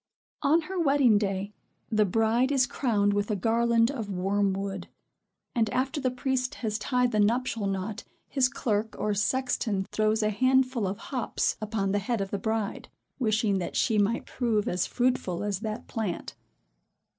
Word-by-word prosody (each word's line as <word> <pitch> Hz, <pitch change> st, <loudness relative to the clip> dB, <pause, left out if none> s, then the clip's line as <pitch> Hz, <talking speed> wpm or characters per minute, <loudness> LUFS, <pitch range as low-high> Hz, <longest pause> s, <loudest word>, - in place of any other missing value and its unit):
On 305 Hz, +3 st, +4 dB
her 370 Hz, +3 st, -4 dB
wedding 275 Hz, -8 st, +4 dB
day, 200 Hz, 0 st, -2 dB, 0.4 s
the 215 Hz, -1 st, +4 dB
bride 225 Hz, +6 st, +2 dB
is 265 Hz, -3 st, +4 dB
crowned 205 Hz, -6 st, +1 dB
with 205 Hz, +1 st, 0 dB
a 210 Hz, -, +1 dB
garland 230 Hz, +3 st, +2 dB
of 225 Hz, -7 st, -5 dB
wormwood; 195 Hz, 0 st, -1 dB, 0.7 s
and, 225 Hz, -2 st, +1 dB
after 270 Hz, +5 st, -1 dB
the 260 Hz, -, +1 dB
priest 255 Hz, 0 st, -1 dB
has 215 Hz, -2 st, -2 dB
tied 250 Hz, +1 st, +1 dB
the 215 Hz, -, +1 dB
nuptial 230 Hz, 0 st, +1 dB
knot, 195 Hz, +3 st, -3 dB, 0.2 s
his 260 Hz, -2 st, +2 dB
clerk 220 Hz, -2 st, -1 dB
or 210 Hz, -, 0 dB
sexton 215 Hz, -2 st, 0 dB
throws 215 Hz, 0 st, +1 dB
a 215 Hz, -, +2 dB
handful 255 Hz, -1 st, +2 dB
of 195 Hz, +2 st, -3 dB
hops 255 Hz, -4 st, -1 dB
upon 210 Hz, -2 st, -1 dB
the 205 Hz, -, +1 dB
head 230 Hz, +3 st, -1 dB
of 195 Hz, -1 st, -3 dB
the 200 Hz, -, -2 dB
bride, 220 Hz, 0 st, -2 dB, 0.3 s
wishing 215 Hz, -4 st, +1 dB
that 175 Hz, -, -4 dB
she 220 Hz, -3 st, +2 dB
might 210 Hz, +4 st, +1 dB
prove 225 Hz, -5 st, 0 dB
as 180 Hz, 0 st, 0 dB
fruitful 245 Hz, -8 st, 0 dB
as 205 Hz, -2 st, -1 dB
that 215 Hz, 0 st, -5 dB
plant. 215 Hz, -6 st, -4 dB
220 Hz, 165 wpm, -28 LUFS, 205-250 Hz, 0.7 s, On